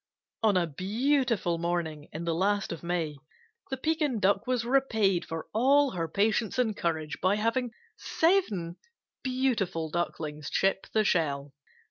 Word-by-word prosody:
On 210 -4 +4
a 175 - +2
beautiful 215 - 0
morning 165 -3 -2
in 160 - -5
the 165 - 0
last 200 +4 0
of 170 - -5
May, 170 -4 -2 0.5
the 265 - -2
Pekin 300 -4 0
Duck 200 +4 +2
was 250 -2 0
repaid 220 -8 +2
for 165 -1 -5
all 275 +5 +4
her 165 -2 -2
patience 210 +7 +1
and 230 -4 +1
courage 160 -3 -2
by 185 +2 +3
having 230 +4 0 0.3
seven 215 - +1 0.4
beautiful 225 - -1
Ducklings 155 -3 -3
chip 195 0 +1
the 215 - +3
shell. 145 -7 0
195 Hz, 140 wpm, -29 LUFS, 165-245 Hz, 0.5 s, On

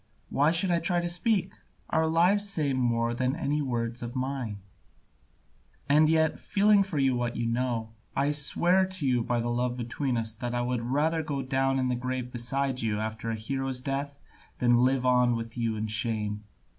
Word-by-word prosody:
Why 145 +2 +3
should 175 +2 +2
I 170 - +3
try 175 +1 0
to 175 - -2
speak? 185 +1 0 0.4
Our 160 0 +2
lives 185 +6 +3
say 150 -7 0
more 120 -2 +1
than 130 +3 0
any 150 -2 -1
words 120 -3 -2
of 120 +2 -6
mine. 130 -5 -3 1.3
And 155 +2 +5
yet, 160 -1 +2
feeling 205 0 +3
for 190 -5 -2
you 135 -2 +2
what 120 -1 -2
you 120 - -2
know, 115 -1 -1 0.2
I 140 +2 +2
swear 175 +6 +2
to 185 -5 -4
you 125 -2 +2
by 120 +1 0
the 120 +1 -1
love 125 +1 -1
between 125 +2 -2
us 110 -1 -2
that 120 +2 -5
I 120 - +1
would 125 -1 -1
rather 150 +7 +1
go 145 -3 -3
down 135 +1 +1
to 130 - +1
the 125 - 0
grave 125 0 -3
beside 130 +2 -1
you 110 -2 -1
after 110 +1 -4
a 115 - -1
hero's 135 +3 -3
death 140 +2 -3 0.4
than 120 0 +4
live 130 0 +2
on 125 -1 +4
with 115 0 -5
you 115 -2 -1
in 110 0 -2
shame. 110 -1 -1
130 Hz, 195 wpm, -28 LUFS, 120-150 Hz, 1.3 s, And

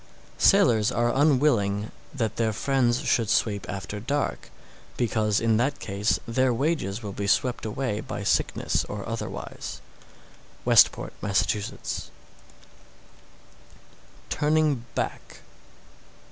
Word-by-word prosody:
Sailors 125 - +4
are 120 0 +1
unwilling 125 -8 +2 0.2
that 115 -6 -2
their 110 -2 +1
friends 125 +1 +1
should 120 -6 +1
sweep 105 -3 +1
after 100 +2 -5
dark, 140 +7 -2 0.5
because 110 -3 +1
in 115 -1 +2
that 135 +5 0
case 100 +2 0
their 130 +2 +2
wages 120 - -1
will 100 -2 -5
be 100 0 -3
swept 125 +3 +1
away 110 -1 -2
by 120 -5 -5
sickness 100 - +1
or 105 -1 -6
otherwise. 115 0 -6 0.9
Westport, - - +4
Mass. 100 -2 +2 2.8
TURNING 150 -4 +1
BACK. - - -4
115 Hz, 105 wpm, -26 LUFS, 105-135 Hz, 2.8 s, Sailors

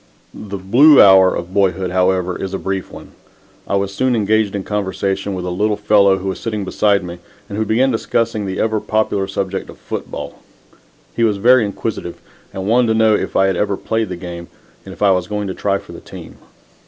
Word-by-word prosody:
The 100 -1 -7
"blue 125 +11 +5
hour" 95 -1 +7
of 85 +2 -6
boyhood, 95 -2 +1
however, 90 0 +1
is 95 0 -4
a - - -1
brief 95 -2 -4
one. - - -12 0.6
I - - -1
was 100 0 -1
soon 130 +4 +1
engaged 110 -1 +1
in 100 - -3
conversation 95 -1 -2
with 90 -1 -5
a 90 - -3
little 105 +3 0
fellow 100 -2 +3
who 95 - -6
was 95 - -5
sitting 105 -3 -4
beside 100 0 +1
me 85 0 -8 0.3
and 100 - -7
who 110 +1 -1
began 125 +5 +2
discussing 115 -2 -1
the 95 - -4
ever 110 -1 0
popular 105 -2 -1
subject 95 0 -4
of - - -12
football. - - -7 0.7
He 115 - 0
was 105 -3 +2
very 120 +4 +5
inquisitive 100 -3 -5 0.3
and 95 - -6
wanted 120 +3 +3
to 110 - +2
know 110 -1 +4
if - - -2
I 95 - +4
had 95 -1 +1
ever 100 +1 -1
played 110 -2 -2
the 90 - -4
game, 85 -1 -8 0.4
and - - -8
if 95 - -6
I 100 - +5
was 90 -1 0
going 105 0 -3
to - - -3
try 100 +1 -1
for - - -13
the - - -9
team. - - -12
100 Hz, 215 wpm, -18 LUFS, 95-110 Hz, 0.7 s, hour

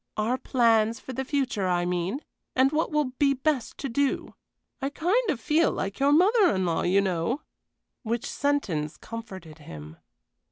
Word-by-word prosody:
Our 230 +4 0
plans 230 -2 +2
for 260 - -8
the 265 - -2
future, 260 -8 -1
I 175 -1 +1
mean, 180 - -2 0.3
and 260 +1 +4
what 310 +1 0
will 300 -4 0
be 280 -2 +3
best 270 -2 -1
to 275 - -4
do; 275 +3 -1 0.5
I 270 - -1
kind 375 +11 +1
of 290 - 0
feel 310 +6 +2
like 195 +5 -4
your 280 +1 +4
mother 380 - +5
in 190 -1 0
law, 165 -2 0
you 190 +3 +3
know." 190 - -1 0.6
Which 235 -1 -2
sentence 190 - -1
comforted 190 -9 -9
him. 80 - -10
240 Hz, 165 wpm, -26 LUFS, 185-285 Hz, 0.6 s, mother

